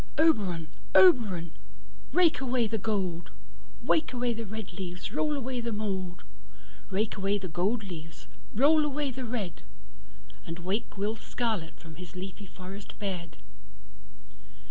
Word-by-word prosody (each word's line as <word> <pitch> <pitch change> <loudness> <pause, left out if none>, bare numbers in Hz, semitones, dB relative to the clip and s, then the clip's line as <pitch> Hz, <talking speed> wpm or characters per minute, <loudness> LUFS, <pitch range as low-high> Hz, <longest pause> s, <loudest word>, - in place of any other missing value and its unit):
Oberon, 200 - +3 0.3
Oberon, 185 -3 +6 0.6
rake 335 -2 +5
away 250 -2 +2
the 220 0 -1
gold, 185 -5 -1 0.5
Rake 305 +3 +3
away 245 -1 +1
the 225 -1 -5
red 220 -2 -5
leaves, 180 -1 -5
roll 300 -1 +1
away 255 -2 -2
the 235 0 -2
mould, 190 -4 -2 0.7
Rake 210 +3 0
away 195 +1 +2
the 190 -2 -4
gold 195 +7 +1
leaves, 165 -5 -8 0.3
roll 300 +6 +6
away 290 -1 0
the 255 0 -4
red, 220 -8 -3 0.8
And 165 - -5
wake 190 +5 -2
Will 210 +3 0
Scarlett 220 -8 -2
from 160 -2 -11
his 180 -2 -9
leafy 190 +1 -6
forest 190 +3 -9
bed. 175 -5 -4
200 Hz, 135 wpm, -30 LUFS, 180-240 Hz, 0.8 s, Oberon